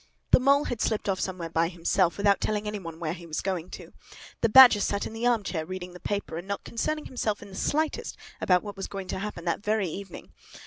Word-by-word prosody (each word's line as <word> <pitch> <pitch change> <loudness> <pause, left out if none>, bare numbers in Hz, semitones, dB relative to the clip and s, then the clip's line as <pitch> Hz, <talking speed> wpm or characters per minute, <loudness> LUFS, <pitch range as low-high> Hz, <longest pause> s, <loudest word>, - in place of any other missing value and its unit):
The - - +7
Mole 280 +3 +4
had 245 -5 -4
slipped 220 -2 0
off 195 -2 0
somewhere 180 -3 -4
by 165 0 +2
himself, 175 0 +1
without 200 0 +3
telling 210 0 -1
any 210 0 -3
one 165 -3 -8
where 160 -2 -2
he 170 -1 -10
was 155 - -3
going 185 -3 -3
to. - - -10 0.5
The 230 - +3
Badger 245 -2 +9
sat 200 0 -1
in - - -6
the 230 +2 -1
arm 235 -4 +2
chair, 165 -5 -3
reading 180 +1 -7
the 180 - -11
paper, 200 -5 -3
and 175 - -10
not 200 0 -3
concerning 305 +6 -2
himself 215 -5 -2
in 200 - -12
the 190 - -11
slightest 310 +8 -1 0.2
about 180 -1 +3
what 205 -1 -7
was 195 - -5
going 195 -2 -7
to - - -3
happen 195 -4 -6
that 170 +3 -1
very 210 -2 +1
evening. 190 +2 -8
200 Hz, 240 wpm, -27 LUFS, 180-215 Hz, 0.5 s, Badger